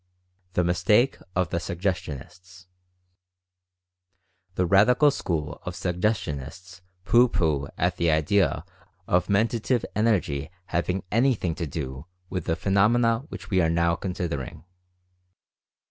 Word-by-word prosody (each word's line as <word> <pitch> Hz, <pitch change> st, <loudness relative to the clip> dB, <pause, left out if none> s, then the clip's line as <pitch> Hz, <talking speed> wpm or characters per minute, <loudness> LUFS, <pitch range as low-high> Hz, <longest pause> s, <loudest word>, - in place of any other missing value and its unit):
THE 90 Hz, -, +2 dB
MISTAKE 90 Hz, +9 st, +2 dB, 0.2 s
OF 90 Hz, -2 st, +1 dB
THE 85 Hz, -, 0 dB
SUGGESTIONISTS. 90 Hz, 0 st, -5 dB, 1.9 s
The 90 Hz, -, +1 dB
radical 120 Hz, -, +5 dB
school 75 Hz, -, -3 dB
of 90 Hz, -, -5 dB
Suggestionists 90 Hz, -, -3 dB, 0.2 s
pooh 120 Hz, +4 st, +5 dB
pooh 75 Hz, -8 st, 0 dB
at 90 Hz, 0 st, 0 dB
the 85 Hz, -1 st, +2 dB
idea 80 Hz, +2 st, +2 dB, 0.4 s
of 90 Hz, 0 st, +1 dB
Mentative 115 Hz, +4 st, +1 dB
Energy 100 Hz, -11 st, +1 dB, 0.2 s
having 90 Hz, +1 st, -1 dB
anything 115 Hz, -7 st, +2 dB
to 85 Hz, 0 st, -4 dB
do 70 Hz, 0 st, -6 dB, 0.2 s
with 90 Hz, -3 st, -3 dB
the 80 Hz, -, 0 dB
phenomena 115 Hz, +6 st, +2 dB
which 95 Hz, +1 st, -9 dB
we 95 Hz, -2 st, +3 dB
are 80 Hz, -, +2 dB
now 85 Hz, 0 st, +2 dB
considering. 85 Hz, -7 st, -4 dB
90 Hz, 115 wpm, -25 LUFS, 85-100 Hz, 1.9 s, radical